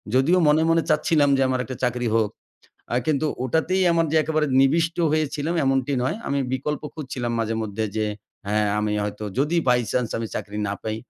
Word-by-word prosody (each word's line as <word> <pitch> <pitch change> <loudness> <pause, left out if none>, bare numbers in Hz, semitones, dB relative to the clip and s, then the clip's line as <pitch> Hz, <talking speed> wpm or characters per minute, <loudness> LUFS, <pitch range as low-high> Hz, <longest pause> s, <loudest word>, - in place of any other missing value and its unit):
যদিও 155 +8 +4
মনে, 150 +1 +4
মনে 165 0 +3
চাচ্ছিলাম 150 -1 +3
যে 135 - +1
আমার 130 0 0
একটা 130 - -6
চাকরি 125 -1 0
হোক, 110 -2 +2 0.6
আ - - +1
কিন্তু 155 0 +1 0.2
ওটাতেই 160 +8 +1
আমার 165 -1 +2
যে - - +3
একেবারে 155 -1 0
নিবিষ্ট 165 +5 +2 0.2
হয়েছিলাম 155 +1 -1
এমনটি 135 +1 +1
নয়। 130 - -1
আমি 140 - 0
বিকল্প 145 +3 -2
খুঁজছিলাম 130 -5 -4
মাঝে 115 0 -1
মধ্যে 110 +1 -3
যে 110 - +1 0.4
হ্যাঁ। 105 +1 +1
আমি 105 0 0
হয়তো 105 +1 -4
যদি 150 +5 +1
বাই 125 0 +4
চান্স 125 -3 0
আমি 115 - -3
চাকরি 105 +1 -5
না - - -1
পাই 110 0 -3
135 Hz, 190 wpm, -23 LUFS, 115-155 Hz, 0.6 s, যদিও